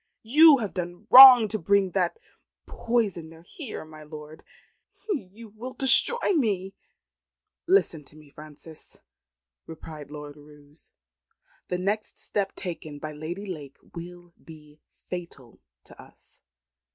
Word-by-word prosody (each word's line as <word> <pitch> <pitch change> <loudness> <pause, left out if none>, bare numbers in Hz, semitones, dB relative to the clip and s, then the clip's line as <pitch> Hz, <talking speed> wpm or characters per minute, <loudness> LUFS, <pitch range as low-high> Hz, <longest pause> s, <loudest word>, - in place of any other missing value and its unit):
You 300 +6 +6
have 215 -5 -5
done 175 +2 -7
wrong 255 -3 +10
to 215 - -4
bring 195 +2 +1
that 180 -1 -2 0.5
poisoner 175 -9 -4
here, 240 - -8
my 155 0 -14
lord. 150 0 -12 0.7
You 225 - -7
will 235 +5 -10
destroy 405 - +4
me." 195 - -2 0.9
"Listen 345 - +1
to 150 - -16
me, 150 -2 -18
Frances," 155 +1 -12 0.7
replied 155 -2 -11
Lord 150 0 -10
Roos. 150 +1 -19 0.8
"The 180 - -3
next 205 +4 -4
step 200 -2 -4
taken 165 -5 -8
by 155 +1 -8
Lady 160 +7 -8
Lake 150 -8 -9 0.2
will 175 0 -11
be 150 -2 -16 0.3
fatal 170 -9 -9 0.2
to - - -16
us. - - -20
175 Hz, 120 wpm, -25 LUFS, 155-215 Hz, 0.9 s, wrong